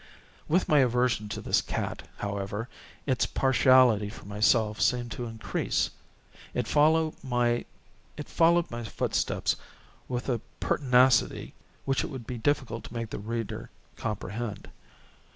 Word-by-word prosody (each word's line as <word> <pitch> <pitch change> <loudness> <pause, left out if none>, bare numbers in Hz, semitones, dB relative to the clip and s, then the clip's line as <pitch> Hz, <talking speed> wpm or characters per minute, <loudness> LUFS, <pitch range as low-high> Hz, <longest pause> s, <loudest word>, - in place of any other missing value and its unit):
With 180 +4 +2
my 150 - +5
aversion 125 -4 +2
to - - -4
this - - +2
cat, - - -4
however, 100 +2 -3 0.4
its 130 -4 +1
partiality 130 -5 +4
for 110 - -11
myself 105 +1 +2
seemed 120 -1 +1
to 120 - -4
increase. 115 -1 -1 0.6
It 125 -2 -1
followed 155 +1 +3
my 120 -2 +1 0.6
footsteps 165 -9 +1 0.5
with 125 0 -3
a 120 -5 0 0.2
pertinacity 125 -2 +3 0.3
which 135 0 +1
it - - -3
would 130 -7 -7
be 120 +1 -5
difficult 120 -2 -1
to - - -10
make 115 -1 -4
the - - -4
reader 115 +1 -4 0.3
comprehend. 105 0 -4
120 Hz, 120 wpm, -28 LUFS, 110-130 Hz, 0.6 s, my